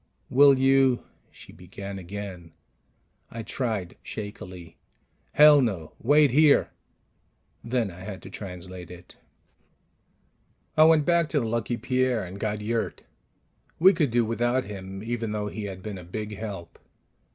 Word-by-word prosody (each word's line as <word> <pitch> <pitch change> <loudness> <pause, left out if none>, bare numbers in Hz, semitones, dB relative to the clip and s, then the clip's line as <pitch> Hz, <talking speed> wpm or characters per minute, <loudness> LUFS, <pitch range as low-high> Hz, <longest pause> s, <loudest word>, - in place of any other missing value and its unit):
"Will 140 +1 +7
you 135 -1 +3
" - - -39
she - - -15
began 100 +2 -8
again. 95 -2 -8 0.8
I 115 0 -7
tried 110 -7 -3
shakily, 90 -5 -8 0.6
"Hell, 150 -1 +8
no. 95 -11 -2
Wait 145 +2 +4
here." 150 +2 +4 0.9
Then 115 -4 -1
I 85 - -12
had 95 0 -8
to - - -10
translate 90 -2 -8
it. 90 0 -13 1.6
I 155 - +7
went 160 -2 +5
back 170 -1 +2
to 150 - +1
the 120 - -2
Lucky 115 +1 -2
Pierre 125 -1 0
and 95 +2 -8
got 105 -1 -2
Yurt. 115 +2 -2 0.7
We 190 +4 +6
could 155 -5 +1
do 120 0 +2
without 120 +3 0
him, 95 0 -8
even 115 -2 -3
though 105 -1 -2
he 105 0 -6
had 95 -2 -7
been 105 -3 -6
a - - -10
big 105 +4 -6
help. 95 -5 -7
110 Hz, 145 wpm, -26 LUFS, 95-130 Hz, 1.6 s, Hell